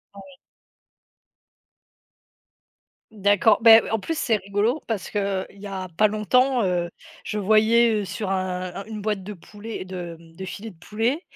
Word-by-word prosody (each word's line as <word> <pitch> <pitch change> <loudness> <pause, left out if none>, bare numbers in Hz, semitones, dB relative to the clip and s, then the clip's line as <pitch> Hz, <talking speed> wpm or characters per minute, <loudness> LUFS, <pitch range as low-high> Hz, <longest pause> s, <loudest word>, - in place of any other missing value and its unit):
Ouais. 190 -2 -13 2.8
D'accord, 205 0 +3
ben, 225 -1 +8
heu, - - -6
en 225 - +1
plus 325 +10 -4
c'est 230 -7 +1
rigolo 205 +8 -1
parce 220 -5 -3
qu'il 195 -2 -1
y 200 +1 -10
a 190 -1 -5
pas 215 - +5
longtemps, 240 +4 +2
heu, 175 -2 0 0.3
je 210 - -4
voyais, 220 +3 +4
heu, - - -4
sur 190 +1 -4
un 185 -1 -2
un 195 +2 -7
une 215 -1 -7
boîte 205 -2 -2
de 210 +3 -7
poulet 210 +3 -8
de, 175 -3 -7
hem, 165 -1 -18
de 190 - -7
filet 210 +4 -7
de - - -20
poulet, 225 - -1
205 Hz, 165 wpm, -24 LUFS, 185-220 Hz, 2.8 s, ben